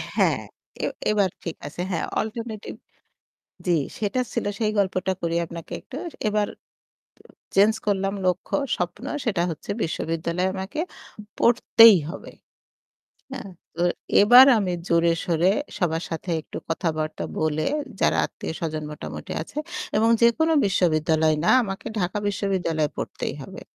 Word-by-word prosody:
হ্যাঁ, - - +3 0.4
এ - - +2 0.3
এবার 200 -3 +2
ঠিক 170 - -4
আছে। 175 - -6
হ্যাঁ 170 - -1 0.2
অল্টারনেটিভ 220 -1 -6 0.9
জি 175 - +3 0.3
সেটা 220 +4 0
ছিল - - -1
সেই 215 -2 +1
গল্পটা 190 -1 +1
করি 170 0 0
আপনাকে। 170 -1 -9
একটু 265 - -11 0.3
এবার 210 -1 +1 1.1
চেঞ্জ 205 +3 +6
করলাম 195 -1 0
লক্ষ্য 180 0 0 0.2
স্বপ্ন 180 +8 -4 0.2
সেটা 195 -6 +1
হচ্ছে 155 - -10
বিশ্ববিদ্যালয়ে 165 +2 -1
আমাকে 190 +11 -5 0.6
পড়তেই 230 -3 +7
হবে। - - -9 1.0
হ্যাঁ? 200 -7 -6 0.2
তো 170 - -2 0.4
এবার 245 +5 +9
আমি 185 -3 -1 0.2
জোরে 170 0 +4
সোরে 175 +1 +2 0.3
সবার 165 -2 0
সাথে 165 +2 -4
একটু - - -8
কথাবার্তা 155 -2 -2
বলে, 155 0 0 0.4
যারা - - +3
আত্মীয় - - -6
স্বজন 155 -2 -3
মোটামুটি 150 - -7
আছে - - -8 0.4
এবং 225 +1 +4
যেকোনো 320 +8 +4
বিশ্ববিদ্যালয় 160 -4 +2
না - - +4
আমাকে 195 -3 -6
ঢাকা 180 +4 -1
বিশ্ববিদ্যালয়ে 175 -6 0
পড়তেই - - -4
হবে। - - -10
185 Hz, 130 wpm, -24 LUFS, 165-210 Hz, 1.1 s, এবার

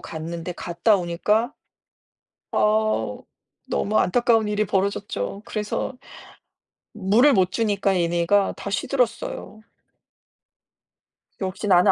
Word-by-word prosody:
갔는데 165 +2 -6
갔다 180 +6 +1
오니까 210 +8 0 1.0
아 215 +1 +1 0.5
너무 215 +2 0
안타까운 225 +1 +3
일이 210 0 0
벌어졌죠. 195 - -2
그래서 215 +4 -3 1.0
물을 220 +8 +4
못 185 -2 +3
주니까 200 -3 +1
얘네가 175 +4 +2
다 200 - -5
시들었어요. 230 -2 -2 1.8
역시 190 +2 -3
나는 180 -2 +6
200 Hz, 215 characters per minute, -23 LUFS, 180-215 Hz, 1.8 s, 나는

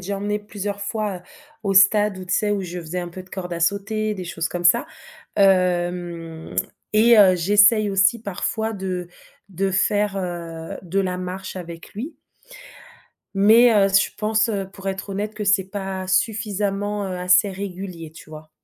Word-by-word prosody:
déjà 195 +2 -4
emmené 210 +1 -1
plusieurs 205 -1 -5
fois, 210 -1 -2
heu, - - -11 0.4
au 200 -1 0
stade 195 +1 +5
où 185 - -8
tu 180 - 0
sais 210 - +1
où 205 -1 0
je 180 -1 -6
faisais 170 +2 -5
un 175 - -5
peu 185 +2 -9
de 185 - -21
corde 180 -2 -5
à 170 - -5
sauter, 210 +4 0
des 185 -3 -6
choses 165 -1 -3
comme 175 0 -5
ça, 175 - +5 0.5
hem 175 -4 0 0.4
et 225 +2 +6
heu, 190 -3 +7
j'essaye 205 +4 +4
aussi 195 +3 +3
parfois 220 +2 -3
de 185 -2 -4 0.4
de 195 +1 -1
faire, 200 +1 +1
heu, 170 -3 -5
de 185 +2 -1
la 185 -1 -2
marche 185 +1 -6
avec 170 -1 -9
lui. 275 +10 -6 1.2
Mais, 225 +4 +6
heu, 195 -1 +4
je 195 0 +3
pense, 220 +2 +1
heu, 200 -3 -2
pour 195 0 -6
être 195 +1 -5
honnête 210 +2 -3
que 210 - -4
c'est 200 -1 +3
pas 190 -2 -4
suffisamment, 205 0 -1
heu, 185 - -4
assez 180 +3 +4
régulier 185 -4 -7
tu 160 -1 -14
vois? 155 0 -11
195 Hz, 175 wpm, -22 LUFS, 180-205 Hz, 1.2 s, heu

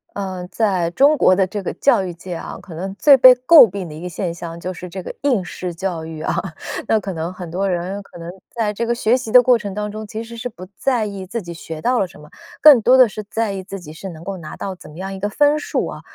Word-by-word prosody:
呃， 185 -3 -5
在 190 -6 +1
中 280 - +4
国 185 - +5
的 190 0 +3
这 205 +2 -5
个 185 - -3
教 240 -8 +3
育 185 - -4
界 175 +2 -8
啊， - - -7
可 185 - -12
能 190 +4 -5
最 280 +6 +6
被 255 0 +9
诟 255 - +7
病 190 -1 -6
的 155 - -9
一 155 - -9
个 180 - -5
现 175 0 -3
象 170 -1 -8
就 185 +2 -5
是 180 +1 -9
这 190 +1 -7
个 - - -7
应 255 -9 +1
试 175 -1 -6
教 175 -2 -3
育 160 -1 -8
啊， - - -1 0.5
那 220 - +3
可 195 -2 -5
能 165 +1 -4
很 180 -2 -8
多 195 +2 -1
人 185 +3 -3
可 195 - -15
能 170 +1 -7 0.2
在 220 -3 -2
这 230 +3 -2
个 235 - +1
学 235 0 +2
习 250 -4 -4
的 250 - +9
过 250 0 +5
程 205 -3 -6
当 210 0 -3
中 215 +1 -7
其 220 +2 -6
实 235 0 -10
是 240 +2 -5
不 185 -5 -11
在 250 -5 0
意 200 -2 -6
自 230 +3 -4
己 170 -2 -8
学 160 -1 -8
到 245 +4 +1
了 190 - +1
什 160 - -16
么， 150 - -14 0.3
更 290 -6 +9
多 250 +4 +5
的 255 -2 +7
是 215 0 -7
在 225 -2 -1
意 190 -1 -4
自 195 +1 -7
己 155 -3 -11
是 190 +4 -8
能 160 -1 -10
够 195 +1 -5
拿 155 -3 -9
到 195 - -5
怎 175 - -14
么 155 - -13
样 190 +1 -5
一 190 - -7
个 205 - -2
分 290 +7 +3
数 - - -2
啊。 - - -8
195 Hz, 310 characters per minute, -20 LUFS, 175-225 Hz, 0.5 s, 被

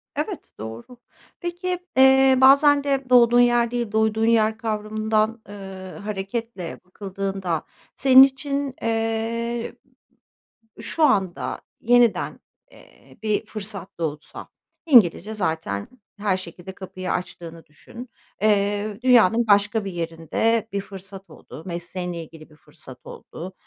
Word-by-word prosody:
Evet, - - -5
doğru. 115 - -9 0.4
Peki, 355 +1 -3 0.2
eee, 265 0 +6
bazen 280 +2 +6
de 275 -1 -1
doğduğun 240 -1 +6
yer 240 -1 +3
değil, 240 -3 -2
doyduğun 220 0 +1
yer 220 -1 +3
kavramından, 215 0 -1
eee, 205 - -9 0.5
hareketle 205 -1 -5
bakıldığında 195 -3 -4 0.3
senin 265 0 +8
için, 275 0 -1
eee, 230 +1 -2 1.1
şu 325 - 0
anda 185 - +1 0.2
yeniden, 240 -1 +2 0.3
eee, - - -20
bir 215 -1 0
fırsat 200 -3 -6
doğsa, 150 -2 -5 0.4
İngilizce 220 - +5
zaten 160 - -2 0.3
her 200 -2 0
şekilde 175 +1 -9
kapıyı 185 -1 -6
açtığını 170 -2 -6
düşün, 235 +11 -12 0.3
eee, 205 0 +1
dünyanın 235 -2 +4
başka 205 +1 +3
bir 195 - -4
yerinde 170 +7 -1
bir 200 - -1
fırsat 195 0 -11
oldu. 155 - -12
Mesleğinle 175 0 -5
ilgili 155 0 -14
bir 150 - -19
fırsat 145 -4 -12
oldu. 185 +3 -9
215 Hz, 115 wpm, -23 LUFS, 180-235 Hz, 1.1 s, senin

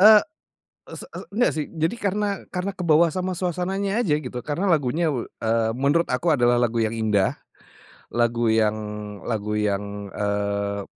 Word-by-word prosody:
eee, 210 +1 +9 0.7
ese - - -7
e - - -5
enggak 230 +5 +2
sih, 155 -2 -2 0.2
jadi 165 +8 +2
karena 205 +1 +1 0.2
karena 185 +2 -2
kebawa 170 -3 +4
sama 185 -1 -2
suasananya 190 +4 -1
aja, 160 -10 +2
gitu. 125 -4 -6
Karena 160 +7 -2
lagunya 160 -1 +2
we 120 - -1 0.2
eee, 115 0 +1
menurut 145 +5 +2
aku 125 +7 -1
adalah 120 -2 +3
lagu 120 -1 +1
yang 110 - +1
indah, 105 -3 +2 0.7
lagu 120 -1 +1
yang 110 -1 +3 0.5
lagu 105 -1 -2
yang, 100 -1 -2
eee, 100 0 -1
125 Hz, 155 wpm, -24 LUFS, 110-180 Hz, 0.7 s, eee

